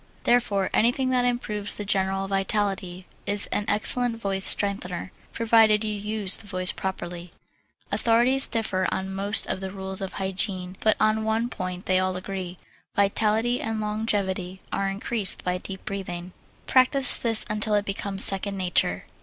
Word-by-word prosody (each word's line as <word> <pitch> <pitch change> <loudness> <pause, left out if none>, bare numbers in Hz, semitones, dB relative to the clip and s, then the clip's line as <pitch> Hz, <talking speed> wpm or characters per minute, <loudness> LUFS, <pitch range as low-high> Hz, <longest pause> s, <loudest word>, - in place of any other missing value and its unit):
Therefore 205 -6 +1
anything 255 +3 +2
that 250 -1 +2
improves 210 -4 -1
the 205 - -5
general 195 0 0
vitality 195 -2 -2 0.2
is 205 0 +3
an 205 - -1
excellent 230 +3 +1
voice 195 -2 0
strengthener, 190 -3 +3 0.2
provided 225 -2 +3
you 215 -1 -2
use 210 -1 0
the 210 - -9
voice 185 -2 +3
properly. 175 -2 -6 0.6
Authorities 240 +4 +3
differ 215 -5 -1
on 190 0 -3
most 200 +2 +3
of - - -3
the 190 - -4
rules 190 0 -5
of 195 - -5
hygiene 190 -1 -2
but 215 - +2
on 215 0 +2
one 220 +2 0
point 185 -4 -6
they 185 -1 +2
all 185 0 -1
agree: 185 -1 -6 0.4
vitality 220 +4 +1
and 225 0 -3
longevity 200 -4 -2
are 195 0 0
increased 200 +1 -2
by 180 0 -2
deep 190 0 -8
breathing. 180 -3 -5 0.3
Practise 260 0 +4
this 225 -2 +5
until 210 0 0
it 205 0 +1
becomes 195 0 -2
second 195 0 +2
nature. 180 -1 0
200 Hz, 155 wpm, -25 LUFS, 190-220 Hz, 0.6 s, this